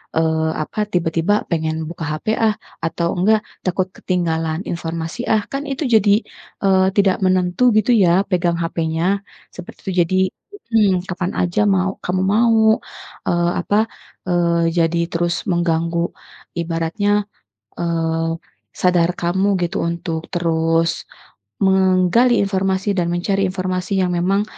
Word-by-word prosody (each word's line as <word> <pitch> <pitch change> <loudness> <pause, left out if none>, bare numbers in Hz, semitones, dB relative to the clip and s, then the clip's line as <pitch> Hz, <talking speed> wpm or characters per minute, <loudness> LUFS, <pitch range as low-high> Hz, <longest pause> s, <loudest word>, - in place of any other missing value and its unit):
eee, 160 0 +1
apa 210 +6 -3
tiba-tiba 175 +3 +1
pengen 160 -1 -1
buka 170 -1 -7
HP 215 +7 -1
ah, 220 -2 +2 0.3
atau 170 +1 -1
enggak 215 +3 +3 0.2
takut 185 +1 0
ketinggalan 165 -2 -1
informasi 165 +6 -4
ah, 215 -1 +3
kan 275 +1 -3
itu 270 +3 -3
jadi, 215 -2 +4 0.4
eee, 190 -1 +4
tidak 195 -2 +3
menentu 185 +6 +3
gitu 215 +3 +3
ya, 190 -3 +4
pegang 175 -2 0
HP-nya 165 +3 -1 0.3
seperti 180 - -11
itu 190 - -2
jadi 185 +3 0 0.5
mhm, 195 -5 +3
kapan 180 -1 -3
saja 180 +3 0
mau 190 -1 +1
kamu 185 +1 0
mau, 220 0 +4 0.5
eee, 175 0 +2
apa, 205 +4 0 0.5
eee 170 -1 +2
jadi 170 0 +2
terus 170 0 -1
mengganggu 170 0 0 0.5
ibaratnya, 170 +5 0 0.5
eee, 165 -1 -1 0.4
sadar 175 -2 +2
kamu 190 +3 +1 0.2
gitu 175 - -2
untuk 170 -1 -3
terus 165 -1 +1 0.6
menggali 190 +5 +4
informasi 190 0 0
dan 170 - +1
mencari 195 +3 0
informasi 185 +1 -3
yang 180 - 0
memang, 195 +4 +2
180 Hz, 125 wpm, -19 LUFS, 170-195 Hz, 0.6 s, jadi